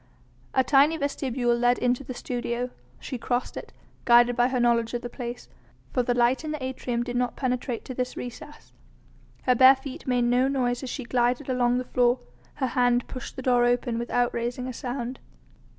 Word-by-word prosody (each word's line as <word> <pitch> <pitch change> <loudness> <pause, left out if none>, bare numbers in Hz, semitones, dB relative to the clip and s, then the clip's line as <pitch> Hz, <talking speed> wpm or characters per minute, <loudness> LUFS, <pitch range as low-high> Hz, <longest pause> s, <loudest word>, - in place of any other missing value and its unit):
A 260 - +5
tiny 285 +4 +4
vestibule 260 -4 0
led 245 +1 +3
into 250 +2 0
the 255 -1 -7
studio, 245 0 -3 0.3
she 255 - -6
crossed 245 +2 -2
it, - - -8 0.3
guided 240 0 +5
by 245 +1 +3
her 255 -1 -1
knowledge 235 -1 +2
of 240 - -4
the 240 - -6
place, 240 -1 -6 0.4
for 250 - +1
the 245 0 0
light 245 +4 +2
in 310 - -4
the 305 -3 -4
atrium 250 -2 -2
did 245 0 -5
not 245 0 0
penetrate 250 -2 -2
to 255 - -6
this 250 0 -3
recess. 250 +4 -9 0.7
Her 255 - +4
bare 260 +2 +8
feet 265 0 -9
made 250 -1 +2
no 245 +2 +3
noise 250 -3 0
as 265 - -5
she 260 - -4
glided 245 +3 0
along 245 -1 +2
the 255 - -2
floor, 245 0 +2 0.4
her 270 - -1
hand 245 -1 +2
pushed 255 - -7
the 260 - -6
door 245 -1 +3
open 240 -1 +1
without 245 0 0
raising 245 +2 -3
a 255 - -5
sound. 245 +1 -5
245 Hz, 195 wpm, -26 LUFS, 240-260 Hz, 0.7 s, bare